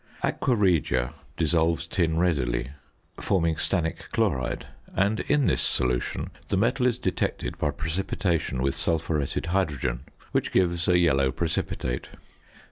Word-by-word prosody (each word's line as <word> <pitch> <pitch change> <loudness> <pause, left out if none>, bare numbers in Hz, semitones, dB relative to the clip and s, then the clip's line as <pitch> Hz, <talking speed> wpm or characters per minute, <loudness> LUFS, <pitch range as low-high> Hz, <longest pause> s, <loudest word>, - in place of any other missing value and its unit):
Aqua 125 - +1
regia 85 - +2 0.2
dissolves 80 0 +2
tin 85 -2 0
readily, 70 -8 +1 0.5
forming 85 -4 +1
stannic 80 +1 -2
chloride, 65 -1 0 0.3
and 100 +3 +2
in 145 -2 +2
this - - +2
solution 60 -1 0 0.2
the 100 - +1
metal 125 +5 +2
is 120 -2 +1
detected 95 -7 -2
by 75 - +1
precipitation 80 -2 -1
with 70 0 +1
sulphuretted 80 -3 -1
hydrogen, 75 -9 0 0.3
which - - 0
gives 85 -2 +2
a 90 - +5
yellow 70 -6 +3
precipitate. 65 -4 -2
85 Hz, 125 wpm, -26 LUFS, 70-95 Hz, 0.5 s, a